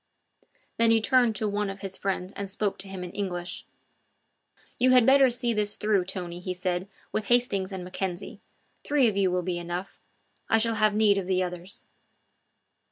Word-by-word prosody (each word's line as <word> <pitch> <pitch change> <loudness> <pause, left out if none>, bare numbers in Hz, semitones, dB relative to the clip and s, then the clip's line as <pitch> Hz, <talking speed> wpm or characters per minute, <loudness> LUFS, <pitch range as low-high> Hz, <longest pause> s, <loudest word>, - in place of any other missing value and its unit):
Then 230 0 +4
he 225 0 +5
turned 240 -1 +3
to 215 +1 -1
one 205 0 -1
of 195 0 -7
his 195 -2 -3
friends 190 -1 -3
and 200 -1 -4
spoke 195 0 -1
to 195 - 0
him 190 -1 -6
in 180 - -7
English: 180 -3 -4 1.1
"You 255 +1 +4
had 250 -2 +6
better 270 0 +6
see 240 -1 0
this 210 -1 0
through, 210 -4 +1
Tony," 180 -2 -5
he 185 0 -4
said, 180 +1 -2 0.2
"with 215 -2 -2
Hastings 210 -6 +2
and 190 -2 -5
Mackenzie. 180 0 -5 0.4
Three 285 -4 +3
of 215 - 0
you 195 -2 +2
will 180 0 0
be 175 -1 -2
enough; 175 +2 -5 0.5
I 225 - +5
shall 230 +1 +2
have 215 -1 +2
need 210 -2 +4
of 185 - -5
the 185 -1 +1
others." 180 +1 -6
195 Hz, 185 wpm, -27 LUFS, 180-220 Hz, 1.1 s, had